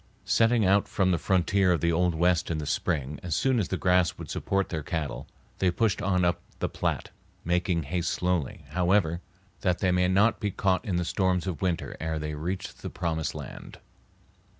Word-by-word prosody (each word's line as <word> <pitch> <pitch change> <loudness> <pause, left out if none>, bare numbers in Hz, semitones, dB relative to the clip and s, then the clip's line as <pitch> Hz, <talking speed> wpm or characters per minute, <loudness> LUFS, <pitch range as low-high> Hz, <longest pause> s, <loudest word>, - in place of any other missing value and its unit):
Setting 115 -1 +3
out 100 +2 +4
from 95 -2 +1
the 85 - +1
frontier 95 +4 +2
of 85 - +2
the 85 - +2
old 90 0 +2
West 85 0 +2
in 80 - -1
the 75 - -3
spring 75 -2 -1
as 85 -3 -2
soon 130 +5 +2
as 100 - 0
the 95 - -2
grass 90 -2 +2
would - - -8
support 100 0 -1
their 80 -3 -3
cattle, 80 -1 -4 0.3
they 95 - +3
pushed 105 +2 +1
on 90 -2 +2
up 85 0 +1 0.2
the - - -1
Platte, - - -2 0.3
making 90 -1 +1
haste 85 +4 -1
slowly, 90 -6 -1
however, 90 -2 +2 0.4
that 90 -1 +1
they 95 - +1
might 90 0 +3
not 105 +5 +3
be 105 - -1
caught 95 -1 +1
in 100 -7 -2
the 90 0 0
storms 95 0 +1
of 90 -6 -4
winter 90 -3 -1
ere 80 0 -2
they 75 0 -3
reached 90 +6 -5
the - - -5
promised 80 -3 -2
land. - - -8
90 Hz, 195 wpm, -27 LUFS, 80-95 Hz, 0.4 s, out